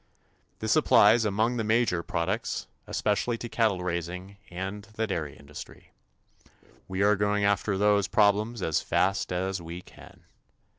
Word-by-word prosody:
This - - +1
applies 110 +2 +5
among 110 +4 +1
the 115 - 0
major 110 -5 +2
products, 90 +6 -2 0.2
especially 110 +3 0
to 120 - -6
cattle 110 -6 +1
raising 90 +3 -4
and 95 +3 -5
the 110 - 0
dairy 80 -9 -4
industry. 70 +1 -12 1.0
We 95 +1 -1
are 105 +1 +5
going 105 0 +1
after 100 0 +1
those 105 -1 +3
problems 105 +1 +2
as 80 - +1
fast 95 0 0
as 95 +1 -2
we 85 +2 -8
can. - - -16
100 Hz, 140 wpm, -27 LUFS, 90-105 Hz, 1.0 s, applies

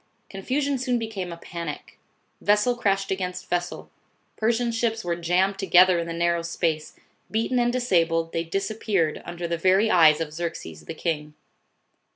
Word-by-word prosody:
Confusion 270 +8 -1
soon 250 -1 0
became 215 -6 -4
a 170 - -7
panic. 170 -3 -7 0.4
Vessel 210 +4 +3
crashed 195 -4 0
against 180 -1 -3
vessel. 175 0 -3 0.4
Persian 235 +2 +1
ships 225 -2 -1
were 170 -1 0
jammed 180 +3 +1
together 185 -2 +5
in 170 - -3
the - - -4
narrow 170 0 +1
space. 165 -2 -2 0.3
Beaten 225 +3 0
and 240 0 +2
disabled, 165 -9 +1
they 165 - 0
disappeared 195 -2 -1
under 175 0 -5
the 170 -1 -2
very 190 +5 +3
eyes 160 -3 +6
of 155 -2 -4
Xerxes 150 - -6
the - - -6
king. 150 -3 -3
180 Hz, 155 wpm, -25 LUFS, 170-220 Hz, 0.4 s, eyes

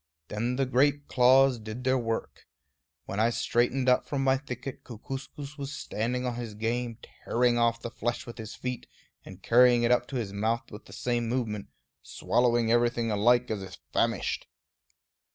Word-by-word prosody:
Then 115 +4 -1
the 135 +1 +1
great 140 +3 +2
claws 130 0 +5
did 110 +3 -7
their 130 0 +2
work. 115 -1 -4 0.6
When 100 - -4
I 115 +2 +4
straightened 120 +2 +1
up 125 0 +3
from 140 -2 -1
my 135 0 +4
thicket, 130 -1 -7
Kookooskoos 135 +5 -8
was 140 0 -4
standing 125 +4 -2
on 125 - -1
his 115 -3 -6
game, 115 +1 -2 0.3
tearing 120 0 +2
off 115 0 +2
the 115 - -4
flesh 120 +1 -3
with 120 0 -10
his 110 -1 -7
feet, 125 -1 -5 0.4
and 95 0 -12
carrying 120 0 +5
it 120 - +3
up 125 0 +3
to 140 - -7
his 110 -6 -3
mouth 115 +4 -1
with 105 +1 -10
the - - -15
same 120 -2 -1
movement, 115 -5 -2 0.3
swallowing 120 -2 +1
everything 120 -1 +2
alike, 120 +4 +3
as 105 -2 -2
if 95 -1 -9 0.2
famished. 115 -10 0
120 Hz, 170 wpm, -28 LUFS, 115-125 Hz, 0.6 s, claws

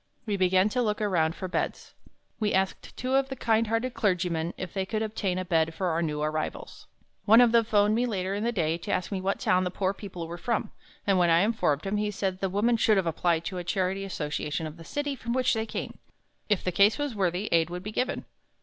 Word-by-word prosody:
We 210 -3 -1
began 185 0 +3
to 250 +3 0
look 210 -3 0
around 175 -6 +1
for 185 - -5
beds. 180 - -3 0.5
We 210 -3 +1
asked 190 0 -2
two 255 +1 -2
of 270 0 +2
the 265 - -4
kind 225 -2 +1
hearted 225 +3 -1
clergymen 180 -7 0
if 185 -2 -6
they 195 - -1
could 215 +3 -2
obtain 210 -4 -2
a 185 - -2
bed 165 -2 +1
for 185 -2 -1
our 165 0 0
new 150 -2 -1
arrivals. 155 +1 -4 0.4
One 225 +2 +7
of 245 -2 +6
them 230 -1 +4
phoned 210 -1 +3
me 240 +3 +1
later 190 -4 -2
in 205 +2 -2
the 235 - +1
day 165 -6 0
to - - -5
ask 180 - -1
me 190 -2 -2
what 195 +1 -1
town 185 0 +2
the 180 - -1
poor 190 +1 -1
people 185 -5 -7
were 170 +1 -7
from, 230 +1 -1 0.3
and 195 -2 +3
when 175 -1 +4
I 165 +1 +5
informed 195 -9 +1
him, 200 +2 -1
he 210 0 0
said 190 -2 -2
"The 195 - -1
woman 220 +5 +2
should 215 -1 +3
have 190 - +1
applied 165 0 0
to 190 - -4
the 180 - -3
charity 190 +1 -1
association 150 -3 -3
of 155 +1 -7
the 165 - -11
city 290 - -2
from 235 -2 -4
which 255 -1 +2
they 220 -1 -1
came. - - -5 0.5
If 205 -3 +2
the 180 - 0
case 200 +4 +4
was 290 -3 -2
worthy, 190 0 0
aid 165 -1 +3
would 180 +1 -6
be 210 - -5
given." 255 +5 -2
195 Hz, 245 wpm, -27 LUFS, 175-220 Hz, 0.5 s, One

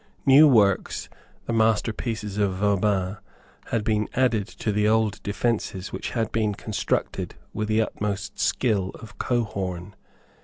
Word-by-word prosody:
New 140 +3 +8
works, 105 -8 +2 0.4
the 115 - -2
masterpieces 110 -1 0
of 100 -2 +1
Vauban, 100 -1 +1 0.5
had 115 - -1
been 105 -1 0
added 120 -6 +2
to 110 - -3
the 105 +1 +2
old 110 -1 +2
defences 100 -2 -2
which - - -4
had 115 -2 -2
been 110 -2 0
constructed 105 0 -2 0.2
with 110 - -2
the 110 +1 +3
utmost 100 -2 -4
skill 105 -7 +1
of 105 -3 -13
Cohorn. 100 -6 -2
105 Hz, 130 wpm, -25 LUFS, 100-115 Hz, 0.5 s, New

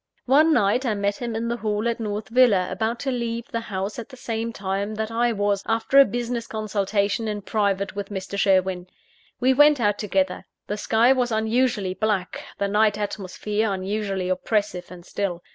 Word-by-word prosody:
One 300 +5 +5
night, 215 -1 +3
I 230 -5 0
met 200 0 -1
him 235 -2 -4
in 230 +1 -2
the 235 +1 -1
hall 215 0 -1
at 235 0 -1
North 210 -1 -4
Villa, 225 -7 +4
about 220 +5 -2
to 270 - -1
leave 235 -1 -3
the 230 - -1
house 205 -1 -4
at 235 - -8
the 260 - -12
same 230 -1 -3
time 200 +1 -3
that 220 +1 -3
I 235 +1 +1
was, 205 -2 0
after 225 +4 +3
a 275 - +9
business 240 +1 -3
consultation 210 0 -1
in 205 -1 -3
private 200 -2 0
with 200 -1 -5
Mr. 195 -1 -5
Sherwin. 190 -2 +2 0.5
We 260 +2 +4
went 295 +1 +6
out 205 -3 +1
together. 190 -3 -1 0.2
The 205 - -3
sky 225 +4 +4
was 250 -2 0
unusually 220 -3 +1
black; 205 -3 -2
the 200 - 0
night 210 +1 +2
atmosphere 210 +1 -2
unusually 195 0 -2
oppressive 185 0 -1
and 175 -1 -12
still. 185 -4 -3
210 Hz, 185 wpm, -24 LUFS, 200-230 Hz, 0.5 s, a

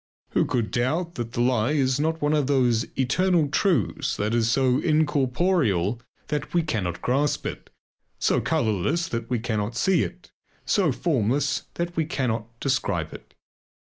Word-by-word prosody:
Who - - +2
could 115 -4 -1
doubt 160 +8 0
that 120 -4 -5
the 120 - 0
lie 125 +1 +2
is 135 -2 +1
not 160 +1 -1
one 145 +1 +2
of 150 -3 +1
those 125 -5 +2
eternal 165 +4 +2
truths 160 - 0
that 105 +2 -1
is 115 -1 +2
so 130 +1 +2
incorporeal 140 - +1 0.3
that 150 +3 -3
we 170 - +3
cannot 100 - -3
grasp 140 +3 0
it, - - -6 0.5
so - - +1
colourless 110 - 0
that 115 -1 -4
we 125 - +1
cannot 110 -1 -2
see 190 -1 +3
it, - - -6 0.3
so 190 -8 +2
formless 135 - 0
that 175 0 -3
we 160 - +1
cannot 120 -7 -2
describe 135 -1 -1
it. - - -13
130 Hz, 155 wpm, -25 LUFS, 115-155 Hz, 0.5 s, we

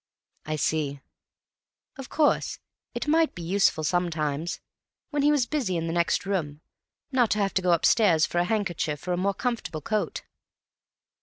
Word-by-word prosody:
"I 155 - -1
see." 150 -2 -1 1.0
"Of 270 -2 -9
course, 305 -1 +1 0.4
it - - -3
might 320 +1 +3
be 175 - -7
useful 180 -2 +2
sometimes, 160 -1 -1 0.5
when 290 -1 0
he 290 - +4
was 285 -5 +2
busy 240 - -1
in 165 - -2
the 165 - -2
next 170 +3 +1
room, 160 -7 -2 0.5
not 250 -4 +3
to - - +1
have 200 -2 0
to 190 - +1
go 180 -1 +2
upstairs 170 -1 +4
for 175 - -1
a 175 - +2
handkerchief 175 -7 -2
or 180 - +1
a - - +1
more 195 +2 0
comfortable 235 -11 -3
coat." 215 +3 -2
180 Hz, 165 wpm, -26 LUFS, 160-225 Hz, 1.0 s, he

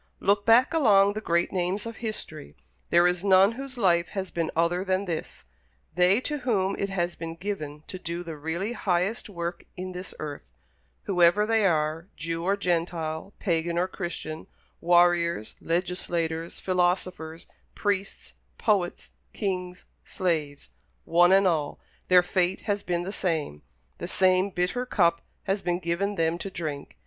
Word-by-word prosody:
Look 200 +1 +2
back 235 +7 +6
along 205 -10 +5
the 215 - -4
great 170 -3 +1
names 185 +3 -1
of 230 -1 -6
history; 160 - -6 0.3
there 170 +1 +5
is 180 0 +1
none 195 +1 +6
whose 265 +2 -7
life 170 -6 +3
has 190 -1 -3
been 165 -2 -1
other 170 +3 +1
than 190 +1 0
this. 170 -4 -5 0.5
They 180 +4 +4
to 295 +2 -3
whom 200 -7 0
it 200 - -1
has 175 -2 -1
been 165 0 -6
given 155 -6 -5
to 185 - -5
do 170 0 -4
the 165 -2 -6
really 165 +9 -3
highest 195 +2 -1
work 170 -2 -4
in 185 0 -5
this 180 0 -7
earth 145 - -7 0.5
whoever 180 +2 +4
they 220 -2 +3
are, 160 0 0
Jew 165 +2 -3
or 195 +3 +1
Gentile, 170 -1 -2
Pagan 170 -2 -1
or 180 +1 +2
Christian, 170 -4 -6 0.3
warriors, 175 -7 +3
legislators, 170 -1 -2
philosophers, 180 -3 -1 0.3
priests, 200 -1 -2 0.2
poets, 195 -5 0 0.2
kings, 180 -3 -3 0.2
slaves 155 - -2 0.4
one 175 +2 +5
and 195 +1 +5
all, 155 -5 0 0.3
their 180 -1 +6
fate 180 +1 0
has 205 -1 -1
been 175 -1 -1
the 195 +3 -5
same 155 - -2 0.4
the - - -4
same 185 +1 +3
bitter 180 +7 -1
cup 170 -9 +2 0.2
has 195 +1 -1
been 175 -1 0
given 185 +4 -1
them 165 -1 0
to 195 - -5
drink. 155 -6 -6
180 Hz, 155 wpm, -27 LUFS, 170-195 Hz, 0.5 s, back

